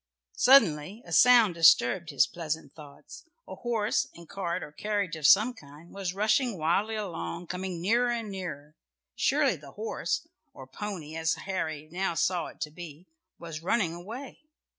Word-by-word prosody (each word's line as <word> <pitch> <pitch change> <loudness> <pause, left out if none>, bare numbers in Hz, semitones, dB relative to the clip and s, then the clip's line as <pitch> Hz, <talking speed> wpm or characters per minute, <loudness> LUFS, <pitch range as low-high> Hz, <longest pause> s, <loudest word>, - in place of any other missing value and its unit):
Suddenly 205 - +4
a - - -12
sound 240 -6 +6
disturbed 165 0 +4
his 140 -4 +4
pleasant 160 -4 -5
thoughts. 145 -3 -13 0.2
A - - -8
horse 220 - -1
and 170 -1 -13
cart 190 -4 -3
or - - -9
carriage 205 0 -2
of 155 -3 +2
some 220 +5 +6
kind 150 - -15
was 190 -2 -4
rushing 220 +2 +1
wildly 185 +8 0
along, 180 -4 -5
coming 180 0 -5
nearer 235 +7 +2
and 230 -3 -3
nearer. 155 -6 -7 0.4
Surely - - +2
the - - -14
horse, - - -3 0.3
or 130 - -10
pony, 160 +1 -7
as 160 0 0
Harry 155 -6 -4
now 180 0 -1
saw 180 0 0
it - - -14
to 150 - -3
be, 165 0 -10 0.3
was 165 -2 -8
running 180 -1 0
away. 225 +11 -9
175 Hz, 160 wpm, -28 LUFS, 160-210 Hz, 0.4 s, sound